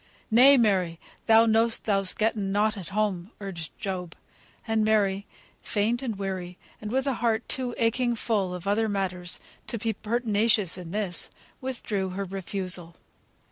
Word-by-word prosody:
"Nay, 265 Hz, +5 st, +8 dB
Mary, 185 Hz, -8 st, +2 dB, 0.3 s
thou 225 Hz, 0 st, +7 dB
know'st 225 Hz, +1 st, +3 dB
thou'st 195 Hz, -3 st, +1 dB
getten 215 Hz, -3 st, 0 dB
nought 210 Hz, +2 st, +2 dB
at 190 Hz, -4 st, -7 dB
home," 200 Hz, -3 st, -1 dB
urged 175 Hz, -6 st, -6 dB
Job. 185 Hz, -4 st, -4 dB, 0.5 s
And 225 Hz, -1 st, +2 dB
Mary, 200 Hz, -2 st, +2 dB, 0.3 s
faint 225 Hz, +4 st, 0 dB
and 240 Hz, -5 st, -3 dB
weary, 185 Hz, -2 st, -4 dB, 0.2 s
and 210 Hz, 0 st, -5 dB
with 265 Hz, +2 st, +1 dB
a 275 Hz, -, +1 dB
heart 230 Hz, -1 st, +1 dB
too 250 Hz, -2 st, 0 dB
aching 240 Hz, +1 st, +1 dB
full 200 Hz, -5 st, -1 dB
of 180 Hz, 0 st, -8 dB
other 215 Hz, +2 st, +1 dB
matters 180 Hz, -3 st, -2 dB, 0.3 s
to 235 Hz, -, -2 dB
be 225 Hz, 0 st, -1 dB
pertinacious 215 Hz, -3 st, +1 dB
in 180 Hz, -2 st, -8 dB
this, 195 Hz, -2 st, -2 dB, 0.3 s
withdrew 220 Hz, -7 st, -2 dB
her 200 Hz, -, -2 dB
refusal. 185 Hz, -2 st, -3 dB
205 Hz, 150 wpm, -27 LUFS, 190-225 Hz, 0.5 s, Nay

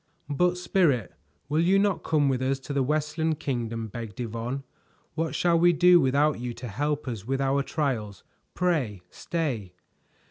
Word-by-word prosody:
"But, 180 Hz, +5 st, +2 dB
Spirit, 165 Hz, -, +1 dB, 0.3 s
will 150 Hz, +2 st, 0 dB
you 185 Hz, +3 st, +4 dB
not 200 Hz, -1 st, +2 dB
come 150 Hz, -3 st, +2 dB
with 130 Hz, -2 st, +1 dB
us 135 Hz, +1 st, +1 dB
to 140 Hz, -, -6 dB
the 140 Hz, -, +1 dB
Westland 155 Hz, +3 st, 0 dB
Kingdom?" 115 Hz, -4 st, -3 dB
begged 110 Hz, -1 st, -8 dB
Yvonne. 120 Hz, +3 st, -4 dB, 0.5 s
"What 165 Hz, +1 st, -2 dB
shall 170 Hz, -1 st, +3 dB
we 175 Hz, +1 st, +5 dB
do 175 Hz, +1 st, +6 dB
without 140 Hz, +1 st, +2 dB
you 120 Hz, -1 st, -4 dB
to 120 Hz, +1 st, -7 dB
help 145 Hz, +7 st, -2 dB
us 110 Hz, -4 st, -5 dB
with 135 Hz, 0 st, 0 dB
our 135 Hz, +1 st, +2 dB
trials? 125 Hz, -, -2 dB, 0.3 s
Pray 140 Hz, -, 0 dB
stay." 120 Hz, -, -3 dB
140 Hz, 165 wpm, -27 LUFS, 120-160 Hz, 0.5 s, do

